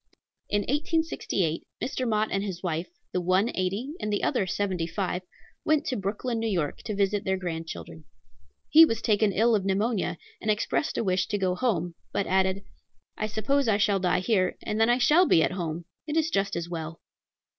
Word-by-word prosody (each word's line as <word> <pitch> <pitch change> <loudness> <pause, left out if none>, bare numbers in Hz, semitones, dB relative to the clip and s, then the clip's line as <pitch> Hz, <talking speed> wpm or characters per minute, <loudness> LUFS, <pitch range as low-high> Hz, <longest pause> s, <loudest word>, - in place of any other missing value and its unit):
In 205 - +2
1868, 285 - -1 0.2
Mr. 255 -1 -2
Mott 215 0 +1
and 195 0 0
his 190 -3 -5
wife, 165 -1 -2 0.2
the 180 - -1
one 185 +6 +2
eighty, 200 +10 -2
and 210 - -2
the 205 - -1
other 225 -9 +1
seventy 185 -3 -1
five, 180 +1 -2 0.4
went 310 -1 +2
to 255 - -1
Brooklyn, 225 +4 -2
N.Y., 180 -10 0
to 210 - -3
visit 200 0 +1
their 190 0 0
grandchildren. 160 - -6 0.6
He 320 - +9
was 230 -8 +3
taken 210 -1 +2
ill 230 +4 +3
of 205 -3 +2
pneumonia, 195 -2 0 0.2
and 215 - -2
expressed 215 +7 0
a - - +1
wish 185 -2 +1
to 205 - -1
go 185 -2 +1
home, 180 -5 0 0.2
but 200 - 0
added, 190 +1 +1 0.5
"I 215 - -2
suppose 230 +6 0
I 210 -2 +3
shall 205 -1 +2
die 180 -1 +1
here, 185 -3 +1
and 215 +1 -1
then 225 - +5
I 240 - +4
shall 305 +8 +5
be 160 - +5
at - - +1
home; 170 -2 -4 0.2
it 305 +1 -1
is 320 0 +1
just 200 -5 0
as 170 0 -3
well." 165 -1 -6
200 Hz, 190 wpm, -27 LUFS, 180-225 Hz, 0.6 s, He